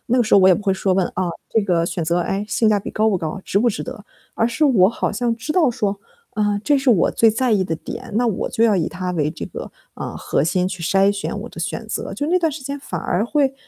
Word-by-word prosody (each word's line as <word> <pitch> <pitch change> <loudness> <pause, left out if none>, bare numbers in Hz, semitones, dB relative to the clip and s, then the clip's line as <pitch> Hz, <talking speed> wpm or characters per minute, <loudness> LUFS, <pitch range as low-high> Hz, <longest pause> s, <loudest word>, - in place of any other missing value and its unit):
那 255 - +4
个 240 - +3
时 215 - +3
候 - - +8
我 190 - +6
也 185 - +7
不 205 - -4
会 195 - +2
说 190 0 0
问， 185 -2 +2
啊， 180 -2 -1 0.2
这 225 - +3
个 175 -4 +1
选 170 0 -3
择， 170 +2 +1
哎， 195 +4 -2
性 225 - +2
价 205 -1 +2
比 - - -6
高 220 0 +2
不 190 - +1
高 160 -2 -3
啊， 195 - -7
值 200 - +1
不 240 +3 +3
值 205 - -3
得？ 205 - -8 0.3
而 225 - +1
是 300 +6 0
我 210 -10 +5
好 230 - -2
像 235 +2 0
知 240 +7 -4
道 310 -7 +3
说， 205 -3 -2 0.3
啊， 205 -1 0
这 290 - +4
是 265 -2 +2
我 190 -7 +3
最 225 - +4
在 245 +2 0
意 200 -3 +3
的 165 - -2
点， 235 +6 -8
那 240 +1 +2
我 215 - -1
就 225 - +2
要 215 -4 +4
以 165 - 0
它 180 -1 -4
为 150 -3 0
这 - - -6
个， - - -8 0.2
嗯， - - -6
核 - - 0
心 180 +3 +1
去 185 -2 -6
筛 195 +3 +3
选 200 - -4
我 - - -8
的 - - -12
选 - - -4
择。 - - -4
就 290 - -2
那 355 - +2
段 325 - +2
时 275 -1 -7
间 280 +2 -4
反 180 - -5
而 190 +5 0
会， 270 +1 +1
205 Hz, 310 characters per minute, -20 LUFS, 185-240 Hz, 0.3 s, 候